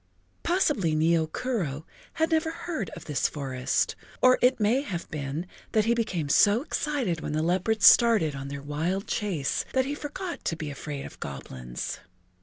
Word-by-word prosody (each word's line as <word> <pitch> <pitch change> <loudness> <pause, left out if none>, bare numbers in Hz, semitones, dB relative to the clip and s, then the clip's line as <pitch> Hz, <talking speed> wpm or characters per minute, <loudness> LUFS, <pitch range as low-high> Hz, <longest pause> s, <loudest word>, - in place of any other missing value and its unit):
Possibly 295 - +1
Nio 160 0 +2
Kuro 170 - -2 0.3
had 320 +1 0
never 320 0 +2
heard 330 - -4
of - - -10
this 150 -3 +1
forest, 130 -3 -1 0.2
or 255 0 +5
it 250 0 +4
may 225 +6 +3
have 180 -11 -5
been 150 +2 -3 0.3
that 215 -1 +3
he 235 - +3
became 200 -10 -1
so 205 - +4
excited 270 - -1
when - - -4
the 155 +1 0
leopards 190 +5 +2
started 220 -12 +6
on 135 0 -6
their 140 0 -6
wild 165 +7 -2
chase 180 -10 -1
that 260 -1 +2
he 280 - -2
forgot 305 +5 -5
to 165 - 0
be 155 -2 -5
afraid 140 0 -6
of - - -11
goblins. 65 0 -6
180 Hz, 170 wpm, -27 LUFS, -, 0.3 s, started